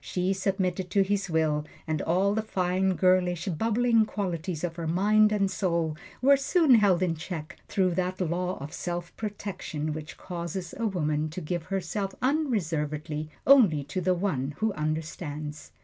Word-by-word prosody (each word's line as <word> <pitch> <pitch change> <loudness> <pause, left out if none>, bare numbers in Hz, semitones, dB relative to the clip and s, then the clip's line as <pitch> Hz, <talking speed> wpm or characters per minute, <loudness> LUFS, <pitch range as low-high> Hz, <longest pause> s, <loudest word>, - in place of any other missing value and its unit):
She 185 +1 0
submitted 190 -1 -1
to 195 +2 +3
his 195 0 -1
will, 155 -2 +1 0.2
and 155 -2 -1
all 190 +4 +2
the 220 - +1
fine, 190 -2 0
girlish, 180 -2 +2
bubbling 225 +5 +2
qualities 180 -5 -3
of 170 -2 -2
her 165 -1 -3
mind 210 +5 +4
and 200 -2 +1
soul 170 -5 0 0.3
were 280 +1 +7
soon 285 +1 +4
held 200 -5 +5
in 175 -2 +1
check 160 -1 -6
through 185 -2 +1
that 185 +1 -1
law 180 +1 -1
of 140 +2 -8
self 175 0 -4
protection 195 -8 -4
which 155 +1 -7
causes 175 0 -5
a 230 - -1
woman 155 -5 0
to 160 - -6
give 175 0 -3
herself 195 +1 -3
unreservedly 160 - -1 0.2
only 210 - +6
to 185 +6 -4
the 180 +1 +2
One 150 -7 -1
who 220 -1 0
Understands. 155 -1 -4
180 Hz, 160 wpm, -28 LUFS, 160-200 Hz, 0.3 s, were